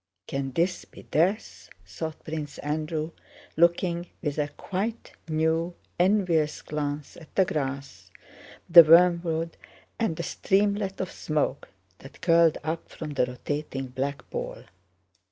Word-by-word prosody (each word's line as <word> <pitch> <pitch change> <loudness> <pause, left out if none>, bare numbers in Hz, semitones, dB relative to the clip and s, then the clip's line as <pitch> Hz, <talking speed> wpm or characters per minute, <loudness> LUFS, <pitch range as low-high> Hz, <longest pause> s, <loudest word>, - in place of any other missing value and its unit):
"Can 135 -1 -3
this 180 +2 0
be - - -14
death?" 185 +8 0 0.2
thought 160 -1 -6
Prince 155 -2 -5
Andrew, 155 +2 -2 0.4
looking 170 +1 +2 0.2
with 150 -1 -2
a 145 - +1
quite 205 +9 -4 0.2
new, 160 +2 +1 0.2
envious 175 -5 +2
glance 145 -1 -4
at 160 -3 -15
the 190 - +5
grass, 135 - -4 0.6
the 170 0 +11
wormwood, 165 0 +4 0.4
and 225 -8 0
the 170 - -3
streamlet 200 +1 0
of 185 - -4
smoke 150 -2 -2 0.3
that 135 - -13
curled 165 -2 +5
up 160 +1 -3
from 155 -2 -7
the 130 -3 +1
rotating 135 +1 -4
black 135 +3 -4
ball. - - -5
160 Hz, 125 wpm, -27 LUFS, 150-175 Hz, 0.6 s, the